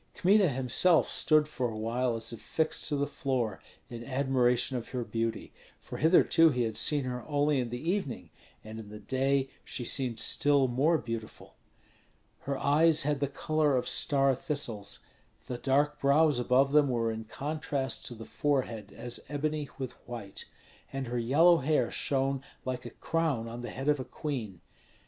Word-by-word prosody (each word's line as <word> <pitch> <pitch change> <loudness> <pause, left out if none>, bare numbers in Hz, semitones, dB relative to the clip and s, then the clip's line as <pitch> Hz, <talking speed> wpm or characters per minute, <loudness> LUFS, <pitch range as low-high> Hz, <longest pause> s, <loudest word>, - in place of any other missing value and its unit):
Kmita 195 0 +4
himself 135 +6 +3
stood 155 -1 +3
for 130 -5 -2
a 110 - -6
while 120 +2 -1
as 115 +1 -2
if 115 - -9
fixed 160 -1 -1
to 150 - 0
the 140 0 0
floor 125 -8 -2 0.3
in 120 -1 -8
admiration 130 -1 +1
of 120 - -4
her 125 -2 -3
beauty; 115 0 -3 0.3
for - - -8
hitherto 165 0 +5
he 125 -4 0
had 110 -2 -3
seen 145 -3 +3
her 125 -1 -4
only 145 -1 +1
in 120 -2 -2
the 125 +9 -2
evening, 190 -11 -4 0.3
and 110 +1 -8
in 105 -2 -10
the 105 - -9
day 135 +5 0 0.2
she 120 - -5
seemed 125 -3 0
still 140 +1 +2
more 140 +7 +2
beautiful. 115 -5 -7 0.9
Her 140 -1 -3
eyes 155 +3 +4
had 145 0 0
the 140 - 0
color 150 0 0
of 125 - -2
star 135 -3 +3
thistles; 125 -7 -3 0.4
the 125 - -5
dark 145 +3 +1
brows 140 0 +3
above 130 +3 +3
them 145 -1 +4
were 115 -2 0
in 110 0 -6
contrast 140 0 -3
to 120 - -7
the 115 0 -10
forehead 130 -7 -2
as 120 0 -3
ebony 150 0 -2
with 130 -2 -4 0.2
white, 115 -5 -8 0.5
and 135 -1 -4
her 120 0 -3
yellow 160 +9 +5
hair 150 +1 +1
shone 135 -1 0 0.2
like 125 -1 -4
a - - -6
crown 150 -4 -2
on 120 +1 -7
the 120 - -6
head 135 +2 -6
of 150 -1 +3
a - - -3
queen. 120 - -5
135 Hz, 175 wpm, -29 LUFS, 120-145 Hz, 0.9 s, hitherto